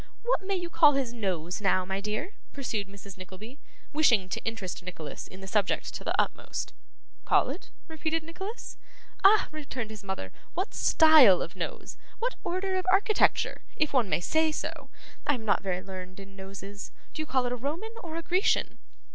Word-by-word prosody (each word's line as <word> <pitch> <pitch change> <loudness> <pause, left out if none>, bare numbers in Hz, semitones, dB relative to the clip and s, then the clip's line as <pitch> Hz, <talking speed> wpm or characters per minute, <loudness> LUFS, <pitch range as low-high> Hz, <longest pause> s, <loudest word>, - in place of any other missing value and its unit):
'What 485 -2 +2
may 390 +1 -1
you 350 -2 -3
call 305 -3 +7
his 265 -4 -1
nose, 185 -5 -2
now, 185 -2 +3
my 190 +1 -2
dear?' 215 - -3 0.2
pursued 225 -7 -2
Mrs. 200 -1 -11
Nickleby, 205 +9 -10 0.3
wishing 235 -11 +4
to - - -3
interest 200 -5 -3
Nicholas 170 -4 -7
in 190 - -12
the 190 - -8
subject 200 -1 0
to - - -6
the - - 0
utmost. - - -1 0.5
'Call - - +3
it?' - - -8 0.2
repeated 320 0 -2
Nicholas. 385 +8 -7 0.5
'Ah!' 415 +2 +7
returned 270 -7 -5
his 210 -2 -9
mother, 190 - -4 0.2
'what 370 +4 -1
style 310 - +7
of - - -8
nose? - - -5 0.2
What - - -1
order 375 +2 -1
of 370 - -2
architecture, 410 +2 +3
if 305 -1 +1
one 245 -7 +3
may - - +1
say 315 - +2
so. - - -5 0.4
I 290 - +4
am 225 -3 -7
not 205 - +3
very 185 -1 -2
learned 185 -1 -8
in 195 0 -11
noses. 195 +1 -8 0.2
Do 310 - -3
you 310 - -4
call 260 -2 +2
it 245 - -1
a - - 0
Roman 310 - -4
or 325 -2 -7
a 335 - -3
Grecian? 370 +5 +1
245 Hz, 185 wpm, -29 LUFS, 195-325 Hz, 0.5 s, call